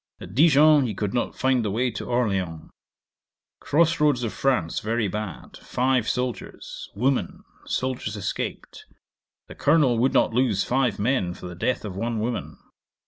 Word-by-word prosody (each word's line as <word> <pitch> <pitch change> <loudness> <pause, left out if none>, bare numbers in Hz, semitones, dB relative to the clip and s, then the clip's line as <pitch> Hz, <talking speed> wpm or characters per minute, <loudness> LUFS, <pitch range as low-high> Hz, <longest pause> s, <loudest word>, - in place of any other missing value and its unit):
At 90 - -10
Dijon 150 0 +5
he 105 - -4
could 105 -1 -2
not 120 - -2
find 130 -2 +2
the 105 - -1
way 120 +5 0
to 105 - -6
Orleans. 95 -10 -1 0.9
Cross 165 +2 +2
roads 145 -5 +2
of 115 - -2
France 125 -13 0
very 110 0 -1
bad. 105 -2 -6
Five 125 -2 0
soldiers. 125 -1 -4
Woman. 130 +5 -1 0.2
Soldiers 125 -5 -2
escaped. 100 - -5 0.6
The - - -10
Colonel 140 -6 +3
would 130 +3 +3
not - - +3
lose 115 -5 +2
five 130 -1 +1
men 100 -5 0
for - - -11
the 90 - -6
death 110 +7 -1
of 95 -3 -6
one 115 +3 -2
woman. 115 +2 -3
120 Hz, 155 wpm, -24 LUFS, 105-130 Hz, 0.9 s, Dijon